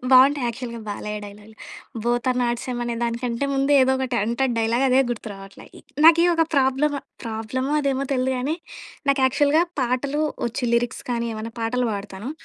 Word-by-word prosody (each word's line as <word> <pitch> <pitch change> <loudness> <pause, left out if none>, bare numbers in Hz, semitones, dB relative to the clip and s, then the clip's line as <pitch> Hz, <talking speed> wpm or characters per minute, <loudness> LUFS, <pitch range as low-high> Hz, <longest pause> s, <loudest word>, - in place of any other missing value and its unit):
బావుంటాయి 265 +1 +6
యాక్చువల్‌గా 235 0 -5
Balayya 210 +1 -4
డైలాగ్‌లు, 210 +2 -13 0.5
both 240 +1 0
are 250 - 0
not 240 -1 0
same 250 -1 -4
అనే 240 -1 -2
దానికంటే 235 +2 -1
ముందు 275 +1 +2
ఏదో 265 0 +4
ఒకటి 260 -2 -1
అంటడు 235 +4 0
డైలాగ్ 230 +4 +1
అదే 260 +1 +5
గుర్తు 230 -2 -4
రావట్లే. 195 0 -12
ఇ - - -13 0.2
నాకి 335 +1 +8
ఒక 330 - +3
ప్రాబ్లము. 275 +2 +2 0.2
ప్రాబ్లమో 230 +5 -3
అదేమో 275 -1 0
తెలియదు 260 0 +1
గానీ 285 +6 -1 0.5
నాకు 275 -1 +3
యాక్చువల్‌గా 290 +4 +3 0.2
పాటలు 260 +4 0 0.2
వచ్చు 240 +2 -3
లిరిక్స్ 235 0 0
కానీ 235 -1 -1
ఏమన్నా 220 +1 -6
పాటలు 245 +2 0
పాడతాను. 200 +4 -6
250 Hz, 170 wpm, -23 LUFS, 230-270 Hz, 0.5 s, నాకి